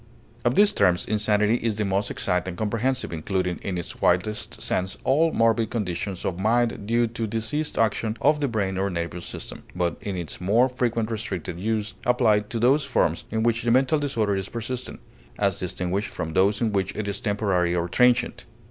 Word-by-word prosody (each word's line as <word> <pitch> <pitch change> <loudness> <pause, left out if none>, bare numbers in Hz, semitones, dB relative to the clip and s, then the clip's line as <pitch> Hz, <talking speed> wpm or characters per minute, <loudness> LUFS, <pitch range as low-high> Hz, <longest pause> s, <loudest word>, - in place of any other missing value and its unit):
Of 120 +1 +2
these 205 0 +5
terms 90 - +3
insanity 105 +1 +2
is 115 -3 -1
the 105 0 -1
most 100 +1 0
exact 90 -1 -1
and 90 -1 -5
comprehensive, 115 +2 -1
including 90 +2 -2
in 95 -2 -3
its 85 - -6
widest 90 +5 0
sense 95 +1 -2
all 160 +5 +3
morbid 115 -1 +2
conditions 95 -3 -3
of 90 -1 -2
mind 115 0 +1
due 120 +1 +3
to 115 0 -3
diseased 115 +8 -1
action 110 0 +1
of 150 +1 +3
the 140 - +2
brain 100 -5 -1
or 100 +1 0
nervous 85 -1 -4
system, - - -7
but 90 -2 -1
in 100 -3 -4
its 85 0 -6
more 110 +8 +4
frequent 115 -3 -1
restricted 110 -6 -4
use 105 +1 -1
applied 110 -4 +2
to 115 - -3
those 130 +6 +3
forms 105 - 0
in 110 0 -1
which 115 0 +2
the 120 - 0
mental 130 +5 +3
disorder 115 -8 0
is 95 0 -3
persistent, 120 +2 -5 0.4
as 100 -3 +1
distinguished 90 +3 -2
from 80 -4 -5
those 100 +5 +3
in 115 -2 +1
which 95 -1 -1
it 110 -1 -3
is 100 0 -3
temporary 100 -5 +1
or 85 0 0
transient. 125 +5 +2
105 Hz, 190 wpm, -25 LUFS, 95-120 Hz, 0.4 s, these